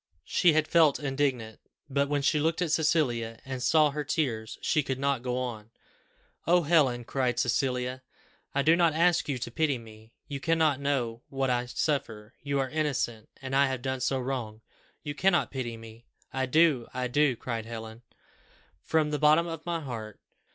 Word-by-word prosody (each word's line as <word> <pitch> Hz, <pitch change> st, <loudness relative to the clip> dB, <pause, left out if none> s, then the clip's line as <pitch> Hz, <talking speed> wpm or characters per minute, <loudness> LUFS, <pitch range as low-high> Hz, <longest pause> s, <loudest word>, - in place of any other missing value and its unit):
She 175 Hz, -3 st, +3 dB
had 155 Hz, 0 st, +2 dB
felt 160 Hz, -4 st, +4 dB
indignant; 135 Hz, -6 st, -2 dB, 0.3 s
but 140 Hz, 0 st, 0 dB
when 145 Hz, -1 st, 0 dB
she 150 Hz, +2 st, +2 dB
looked 160 Hz, +3 st, 0 dB
at 165 Hz, -, -2 dB
Cecilia, 125 Hz, -8 st, +1 dB
and 130 Hz, -1 st, -5 dB
saw 150 Hz, +3 st, +4 dB
her 150 Hz, +1 st, -3 dB
tears, 120 Hz, -7 st, -2 dB
she 155 Hz, -, +1 dB
could 130 Hz, -2 st, -3 dB
not 140 Hz, -2 st, 0 dB
go 125 Hz, 0 st, -2 dB
on. 115 Hz, -4 st, -5 dB, 0.8 s
"Oh 175 Hz, +1 st, +4 dB
Helen!" 140 Hz, -7 st, +3 dB
cried 130 Hz, 0 st, -1 dB
Cecilia, 125 Hz, +1 st, 0 dB, 0.5 s
"I 140 Hz, -, +2 dB
do 160 Hz, +3 st, +5 dB
not 170 Hz, -3 st, +3 dB
ask 170 Hz, -1 st, +2 dB
you 135 Hz, -, 0 dB
to 120 Hz, -1 st, -5 dB
pity 150 Hz, 0 st, +1 dB
me. 110 Hz, -1 st, -14 dB, 0.2 s
You 140 Hz, -1 st, -5 dB
cannot 160 Hz, -2 st, +2 dB
know 125 Hz, -5 st, -1 dB
what 135 Hz, -1 st, -1 dB
I 125 Hz, 0 st, 0 dB
suffer 120 Hz, -5 st, -2 dB
you 140 Hz, -1 st, -1 dB
are 135 Hz, -1 st, -1 dB
innocent 135 Hz, -8 st, -2 dB
and 135 Hz, 0 st, -3 dB
I 140 Hz, 0 st, +5 dB
have 130 Hz, -2 st, -4 dB
done 130 Hz, -1 st, -2 dB
so 130 Hz, +2 st, 0 dB
wrong! 125 Hz, -4 st, -4 dB, 0.4 s
You 145 Hz, -, -4 dB
cannot 175 Hz, +3 st, +2 dB
pity 120 Hz, -4 st, -4 dB
me." 115 Hz, +1 st, -13 dB, 0.3 s
"I 130 Hz, 0 st, -1 dB
do, 150 Hz, -4 st, +3 dB
I 125 Hz, 0 st, -1 dB
do," 135 Hz, +1 st, +2 dB
cried 115 Hz, -1 st, -5 dB
Helen, 110 Hz, 0 st, -8 dB, 0.8 s
"from 155 Hz, -2 st, +1 dB
the 150 Hz, -, -1 dB
bottom 155 Hz, +2 st, +5 dB
of 165 Hz, -1 st, -6 dB
my 170 Hz, -1 st, -1 dB
heart. 110 Hz, -7 st, -7 dB
135 Hz, 180 wpm, -28 LUFS, 120-150 Hz, 0.8 s, do